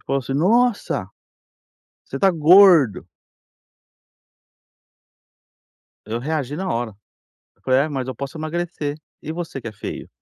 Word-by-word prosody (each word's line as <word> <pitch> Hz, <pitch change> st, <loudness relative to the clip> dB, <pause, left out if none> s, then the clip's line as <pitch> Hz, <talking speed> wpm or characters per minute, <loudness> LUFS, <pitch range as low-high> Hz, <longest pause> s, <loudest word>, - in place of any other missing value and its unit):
e -, -, -29 dB
falou 135 Hz, 0 st, -1 dB
assim: 135 Hz, +1 st, -5 dB
"Nossa, 225 Hz, -, +1 dB, 1.0 s
você -, -, -7 dB
tá 195 Hz, -1 st, +3 dB
gordo." 165 Hz, -, +5 dB, 3.0 s
Eu 110 Hz, +3 st, -4 dB
reagi 145 Hz, 0 st, -3 dB
na 190 Hz, +4 st, -4 dB
hora, 115 Hz, -3 st, -3 dB, 0.6 s
eu -, -, -37 dB
falei: 130 Hz, 0 st, +2 dB
"Ah, 155 Hz, +3 st, -1 dB
mas 130 Hz, -3 st, -4 dB
eu 130 Hz, -, -4 dB
posso 140 Hz, +5 st, -7 dB
emagrecer. 155 Hz, -2 st, -4 dB, 0.3 s
E 155 Hz, -, -5 dB
você 165 Hz, -5 st, -6 dB
que 115 Hz, -, -6 dB
é -, -, -9 dB
feio?" 105 Hz, -, -7 dB
145 Hz, 135 wpm, -21 LUFS, 130-175 Hz, 3.0 s, gordo